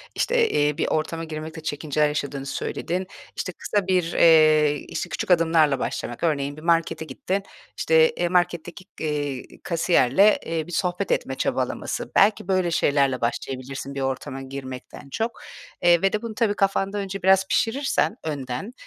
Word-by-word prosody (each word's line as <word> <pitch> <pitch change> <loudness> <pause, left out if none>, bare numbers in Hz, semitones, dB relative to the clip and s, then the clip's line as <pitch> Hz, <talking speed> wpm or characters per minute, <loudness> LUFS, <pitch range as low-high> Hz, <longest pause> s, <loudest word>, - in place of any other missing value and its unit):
işte, 475 -2 +2
eee, 145 0 +1
bir - - 0
ortama 165 +1 -1
girmekte 160 +1 -7
çekinceler 150 0 0
yaşadığını 140 -2 -3
söyledin. 180 +6 -3 0.3
İşte, 185 - -3
kısa 200 +1 -2
bir, 180 -3 +1
eee, 155 -2 +5
işte, - - -4
küçük - - -3
adımlarla 160 -5 +4
başlamak, 120 - -4
örneğin 145 -3 0
bir - - -10
markete 165 -1 +1
gittin, 185 +7 -3 0.3
işte, 480 0 +4
eee, - - 0
marketteki, 175 0 -1
eee, 145 -4 -2 0.2
kasiyerle, 170 +2 +3
eee, 160 -1 -3
bir - - -9
sohbet 180 - -1
etme - - -1
çabalaması, - - -2
belki 205 -2 +4
böyle 185 -3 +1
şeylerle 140 -4 +2
başlayabilirsin 135 +3 -4
bir 140 - -3
ortama 135 0 -3
girmekten 135 0 -8
çok, 225 - -3 0.4
eee, 175 -1 +5
ve 195 - +2
de 210 - 0
bunu 230 -2 -6
tabii 210 -2 +1
kafanda 195 0 0
önce 195 -1 -4
biraz 190 0 +4
pişirirsen 255 0 +1
önden, 140 - -4
165 Hz, 155 wpm, -24 LUFS, 145-190 Hz, 0.4 s, eee